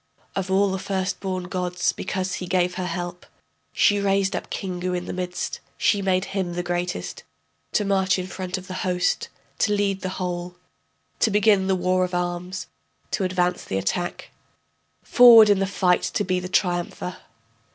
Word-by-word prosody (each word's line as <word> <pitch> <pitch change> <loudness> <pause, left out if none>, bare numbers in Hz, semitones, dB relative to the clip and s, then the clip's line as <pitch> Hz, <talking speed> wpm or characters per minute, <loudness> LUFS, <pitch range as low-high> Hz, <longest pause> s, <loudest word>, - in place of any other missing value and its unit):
Of 195 -1 -2
all 195 +1 +3
the 190 - -2
first 190 0 -2
born 185 -2 -3
gods, 180 0 -1
because 190 -1 -3
he 180 - -4
gave 180 0 +1
her 185 0 -3
help, 175 -1 -5 0.5
She 205 0 +3
raised 195 -1 +1
up - - -5
Kingu 180 -1 -3
in 180 0 -3
the - - -5
midst, 180 -1 -4 0.2
she 205 - +2
made 185 -1 +1
him 190 -3 -1
the 175 +1 -2
greatest, 175 0 -3 0.5
To 210 - +2
march 195 -1 +2
in 185 - -3
front 185 0 -4
of 185 - -9
the 185 - -7
host, 180 -1 0 0.3
to 210 - +2
lead 200 -2 0
the 185 - -3
whole, 180 -1 -4 0.6
To - - +3
begin 205 -2 +3
the 190 - +2
war 185 0 +1
of 180 0 -2
arms, 180 +1 -3 0.5
to - - 0
advance 180 -1 0
the 95 - -3
attack, 95 - -3 0.7
Forward 230 -4 +8
in 200 - +3
the 195 - +1
fight 185 -2 +2
to 205 - -1
be 185 -2 0
the 180 0 -6
triumpher. 180 -1 -1
185 Hz, 175 wpm, -24 LUFS, 180-195 Hz, 0.7 s, Forward